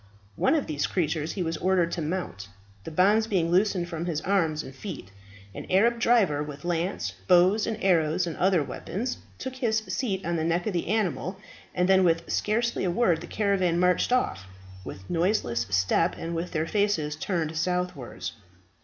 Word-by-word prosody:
One - - +2
of 300 - 0
these 145 -2 -1
creatures 160 -3 -1
he 190 - -2
was 165 0 -2
ordered 180 -2 +1
to 170 - -3
mount, 155 - -4 0.4
the - - -4
bonds 205 +7 +3
being 175 -6 +1
loosed 185 -1 +2
from 170 0 -5
his 160 -4 -1
arms 165 -6 +1
and 130 - -10
feet. 135 - -8 0.4
An - - -8
Arab 230 +5 +3
driver, 210 -12 +3
with 150 +2 -7
lance, 175 +2 -1
bows, 185 +3 +4
and 225 -2 -2
arrows, 170 -1 +2
and 165 -3 -4
other 185 -4 +3
weapons, 225 - -4 0.2
took 260 0 -6
his 230 -4 +1
seat 220 -3 -2
on 170 0 0
the 160 - -1
neck 170 +2 0
of 215 - -1
the 170 - -2
animal, 190 -2 -1 0.4
and 180 0 +2
then 190 0 +5
with 165 -2 +2
scarcely 235 +3 0
a 185 - +1
word 175 -4 +2
the 175 - -8
caravan 190 -5 +1
marched 180 +5 +2
off, 95 - 0 0.4
with 95 0 -9
noiseless 165 - 0
step, 95 - +2
and 165 +1 -4
with 170 +2 -3
their 160 -2 -1
faces 170 -6 0
turned 160 -1 -2
southwards. 180 -5 -2
180 Hz, 180 wpm, -27 LUFS, 160-200 Hz, 0.4 s, then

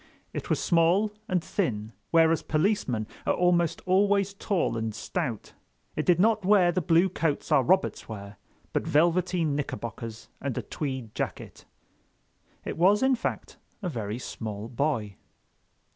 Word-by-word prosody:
It - - -5
was - - +1
small 175 +5 +3 0.2
and 180 -3 0
thin, 110 - -2 0.2
whereas 165 -1 +4
policemen 155 - 0 0.2
are - - +3
almost 175 -2 +2
always 200 +1 +3
tall 195 - -1
and 110 -2 -3
stout. 120 - -4 0.4
It - - -2
did 175 -1 +5
not 215 +1 +3
wear 185 -2 +5
the 185 - 0
blue 170 +2 +4
coats 165 -5 -2
our - - +6
Roberts 185 +2 +1
wear, 100 -2 -8 0.4
but - - -1
velveteen 170 0 +2
knickerbockers 115 -5 -5
and 135 -3 -3
a - - -2
tweed 130 -7 -5
jacket. - - -5 1.0
It - - -5
was, 200 +6 +5
in 265 0 +4
fact, 250 - -3 0.3
a 180 - -1
very 110 -6 -4
small 110 -3 -6
boy. 120 -6 -1
165 Hz, 145 wpm, -27 LUFS, 115-185 Hz, 1.0 s, our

